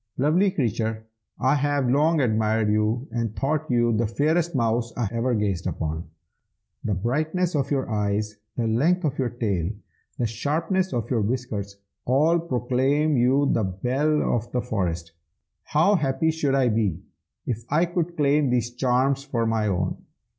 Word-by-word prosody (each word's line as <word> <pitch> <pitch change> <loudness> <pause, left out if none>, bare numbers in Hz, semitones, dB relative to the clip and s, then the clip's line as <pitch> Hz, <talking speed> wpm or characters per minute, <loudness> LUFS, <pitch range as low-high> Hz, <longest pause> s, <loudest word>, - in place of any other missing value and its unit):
'Lovely 160 +9 +3
creature, 110 - -2 0.3
I 130 +3 +3
have 145 -2 +1
long 150 +5 +3
admired 110 -2 +1
you, 110 +5 0
and 115 -2 -2
thought 155 +4 -1
you 120 -2 +2
the 115 +1 +1
fairest 155 +7 0
mouse 115 -1 0
I 120 -3 0
ever 120 +1 0
gazed 100 -5 -1
upon. 80 +1 -3 0.8
The 105 - 0
brightness 155 - -1
of 140 -2 0
your 135 -2 0
eyes, 105 0 -1 0.2
the 120 - -1
length 155 +12 +2
of 145 -2 -2
your 130 -2 +1
tail, 100 -9 -1 0.5
the 120 - 0
sharpness 160 - -1
of 120 -1 -3
your 115 -3 +2
whiskers, 105 -3 -3 0.3
all 155 +7 +3
proclaim 135 +1 +1
you 135 +3 +3
the 115 - +1
belle 130 +11 0
of 120 0 -4
the 125 - 0
forest. 85 -7 -2 0.5
How 165 +7 +3
happy 155 0 +1
should 150 -4 0
I 130 -3 +3
be, 105 -6 0 0.4
if 115 -2 -3
I 155 +5 +3
could 175 0 -3
claim 145 -1 +3
these 120 -1 0
charms 130 +2 +1
for 120 -5 -1
my 110 -1 +1
own! 90 -2 -1
125 Hz, 160 wpm, -24 LUFS, 110-145 Hz, 0.8 s, Lovely